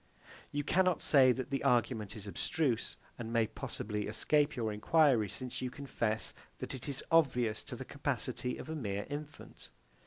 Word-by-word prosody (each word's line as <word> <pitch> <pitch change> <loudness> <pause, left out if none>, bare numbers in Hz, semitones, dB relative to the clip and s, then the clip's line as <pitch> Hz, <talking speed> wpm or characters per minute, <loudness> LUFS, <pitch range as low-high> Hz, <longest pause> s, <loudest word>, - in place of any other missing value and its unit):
You 145 0 -1
cannot 180 +2 +2
say 130 -3 +6
that 130 +2 -3
the 135 - -1
argument 115 -3 +1
is 105 -2 -7
abstruse, 120 +4 -1 0.2
and 115 -1 -5
may 115 -1 +3
possibly 105 -1 -4
escape 145 +8 +2
your 110 -4 -1
enquiry; 125 -1 +4
since 125 +5 -5
you 130 - -1
confess 120 -5 -2 0.2
that - - -5
it 130 +2 -6
is 140 -1 -2
obvious 125 -9 +3
to - - -6
the 130 +2 -7
capacity 125 -3 -2
of - - -8
a 160 - -4
mere 100 -8 -2
infant. 150 +1 -8
125 Hz, 165 wpm, -33 LUFS, 110-145 Hz, 0.2 s, say